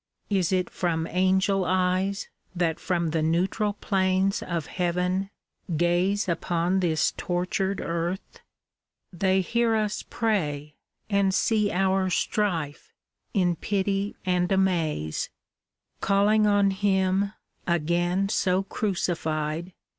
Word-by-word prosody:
Is 190 -3 +2
it 185 -1 +1
from 165 -3 -1
Angel 190 +2 +2
eyes 185 +2 0 0.3
That 170 -2 0
from 170 -3 -1
the 160 0 0
neutral 185 +6 +1
plains 190 0 +1
of 170 -4 -3
Heaven 180 +2 -1 0.5
gaze 175 +5 +1
Upon 175 +1 0
this 165 -4 +1
tortured 185 +2 -1
earth? 170 +3 -3 0.7
They 190 +2 +2
hear 230 +4 +1
us 210 -1 -1
pray. 150 -10 -1 0.4
And 200 -1 +2
see 215 -3 +2
our 190 0 +1
strife, 170 -6 -1 0.4
in 180 -3 +2
pity 195 +2 -1
and 180 -1 +1
amaze; 165 - 0 0.7
Calling 210 +2 +3
on 200 -1 +4
Him, 190 0 +1 0.3
again 175 +3 +1
so 190 -2 +1
crucified. 170 -4 -2
185 Hz, 105 wpm, -26 LUFS, 170-195 Hz, 0.7 s, on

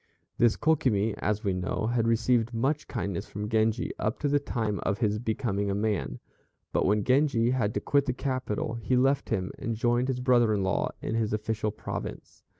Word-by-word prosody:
This 120 -2 +4
Kokimi, 130 -9 +2
as 105 +1 -1
we 100 -3 +1
know, 90 +5 -1
had 115 -2 +1
received 115 0 +2
much 140 +6 0
kindness 100 -4 -3
from 105 +1 -5
Genji 110 +1 +1
up 110 +3 -1
to 150 - +1
the 145 0 +3
time 110 -7 -2
of 100 - -1
his 105 -1 0
becoming 110 -3 -1
a 100 - 0
man; 105 -2 -1 0.5
but - - +2
when 105 +1 +2
Genji 130 -2 +3
had 115 -5 +1
to - - 0
quit 140 -1 +2
the 125 - +1
capital 130 -5 -2
he 130 +4 +1
left 135 +2 +2
him 95 -1 -1
and 115 0 -2
joined 120 +2 +1
his 130 -2 -1
brother 120 -4 +3
in 100 - 0
law 95 - 0
in - - -2
his 110 -2 0
official 110 0 -1
province. 105 - -7
115 Hz, 195 wpm, -28 LUFS, 105-125 Hz, 0.5 s, This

